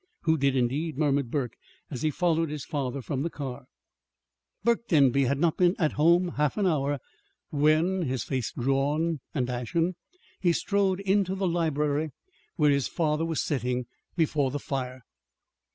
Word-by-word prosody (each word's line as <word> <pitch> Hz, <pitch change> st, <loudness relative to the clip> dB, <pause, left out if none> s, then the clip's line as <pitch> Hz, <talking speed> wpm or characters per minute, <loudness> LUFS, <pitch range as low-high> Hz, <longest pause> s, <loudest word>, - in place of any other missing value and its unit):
"Who 160 Hz, -1 st, +3 dB
did, 140 Hz, -2 st, +1 dB
indeed?" 135 Hz, +5 st, 0 dB
murmured 140 Hz, -4 st, +1 dB
Burke, 130 Hz, -3 st, -2 dB, 0.4 s
as 125 Hz, -4 st, -5 dB
he 155 Hz, -, +2 dB
followed 165 Hz, 0 st, +1 dB
his 150 Hz, -1 st, -5 dB
father 135 Hz, -2 st, -3 dB
from 135 Hz, 0 st, -2 dB
the 165 Hz, -, -1 dB
car. 135 Hz, -5 st, -6 dB, 1.0 s
Burke 235 Hz, +1 st, +1 dB
Denby 140 Hz, -, +4 dB
had 140 Hz, +3 st, +1 dB
not 165 Hz, +1 st, +1 dB
been 180 Hz, +1 st, +4 dB
at 155 Hz, -4 st, +2 dB
home 170 Hz, +4 st, +4 dB
half 150 Hz, +3 st, +1 dB
an 205 Hz, -, +1 dB
hour, 145 Hz, -4 st, +1 dB, 0.5 s
when, 155 Hz, +6 st, +3 dB
his 130 Hz, -7 st, -1 dB
face 130 Hz, -5 st, -2 dB
drawn 145 Hz, +5 st, 0 dB, 0.2 s
and 125 Hz, -4 st, 0 dB
ashen, 125 Hz, +9 st, -1 dB, 0.5 s
he 175 Hz, -2 st, +3 dB
strode 195 Hz, 0 st, +1 dB
into 195 Hz, -1 st, +1 dB
the 195 Hz, -1 st, 0 dB
library 155 Hz, -3 st, 0 dB, 0.5 s
where 150 Hz, -3 st, +4 dB
his 140 Hz, -2 st, +1 dB
father 160 Hz, -1 st, 0 dB
was 165 Hz, -2 st, -1 dB
sitting 125 Hz, -3 st, -1 dB, 0.3 s
before 150 Hz, -5 st, +1 dB
the 140 Hz, -, -3 dB
fire. 130 Hz, -3 st, -4 dB
150 Hz, 160 wpm, -27 LUFS, 135-170 Hz, 1.0 s, Denby